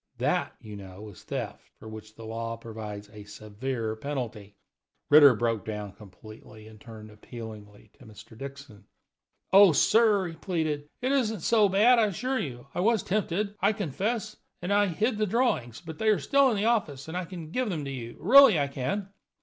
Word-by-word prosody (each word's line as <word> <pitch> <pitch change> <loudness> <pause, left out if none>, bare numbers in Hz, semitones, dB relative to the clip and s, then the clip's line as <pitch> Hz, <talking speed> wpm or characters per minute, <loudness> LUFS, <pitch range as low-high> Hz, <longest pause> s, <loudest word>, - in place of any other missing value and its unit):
That, - - -1
you 105 -1 -10
know, 100 +1 -10
is 95 - -14
theft, - - -6
for - - -13
which 110 0 -11
the 115 - -11
law 115 +1 -5
provides 110 -2 -8
a 105 -1 -10
severe 110 +3 -5
penalty." 110 -6 -6 0.6
Ritter 145 -4 +8
broke 115 -2 -1
down 105 -2 -6
completely 110 +2 -14
and 110 -1 -15
turned 110 -2 -12
appealingly 105 -2 -11
to 125 - -15
Mr. 110 +1 -14
Dixon. 135 -4 -10 0.7
"Oh, 195 -3 +8
sir," 210 - +3
he - - -8
pleaded, 155 -5 -3
"it 260 - +1
isn't 225 -8 0
so 215 +2 +3
bad, 225 +6 +5
I 220 - +4
assure 255 +7 -2
you. 120 -4 -6
I - - -4
was 220 +1 +2
tempted, 200 +1 -1
I 200 +3 +3
confess, 210 - -3 0.2
and 180 +3 -4 0.2
hid 220 +3 0
the 215 - +1
drawings; 180 - -1
but 160 -2 -10
they 220 - -1
are 215 -2 +4
still 275 - +3
in 225 - -1
the 205 - 0
office, 165 - 0
and 160 - -7
I 180 0 -2
can 165 -3 -9
give 250 +2 -1
them 155 -6 -3
to 140 - -5
you 120 -3 -7
really, 250 - +7
I 140 -1 0
can." 140 +10 -3
140 Hz, 185 wpm, -27 LUFS, -, 0.7 s, Ritter